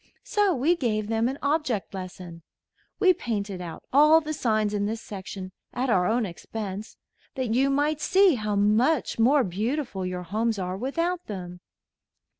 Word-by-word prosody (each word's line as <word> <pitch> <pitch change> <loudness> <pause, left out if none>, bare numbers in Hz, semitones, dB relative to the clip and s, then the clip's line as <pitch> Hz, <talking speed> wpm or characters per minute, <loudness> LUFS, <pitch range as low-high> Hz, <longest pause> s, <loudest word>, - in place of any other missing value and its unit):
So 415 -5 +2
we 295 +7 +2
gave 215 -8 -1
them 225 +1 +1
an 270 - -4
object 285 -10 0
lesson. 180 -3 -8 0.6
We 370 -1 +6
painted 200 - -3
out 170 -2 -7
all 305 +3 +7
the 310 -1 -4
signs 215 -6 0
in 205 -1 0
this 225 +1 -3
section 190 -2 -7 0.2
at 255 0 0
our 180 -3 +3
own 230 +2 +1
expense, 205 +3 -6 0.4
that 255 -4 -1
you 270 +3 +3
might 290 +2 +1
see 380 0 +5
how 215 -4 -2
much 225 +8 +2
more 265 +5 +5
beautiful 215 - -2
your 180 0 -3
homes 220 +5 -1
are 185 -1 -3
without 335 - -2
them. 180 -3 -7
225 Hz, 160 wpm, -26 LUFS, 195-285 Hz, 0.6 s, all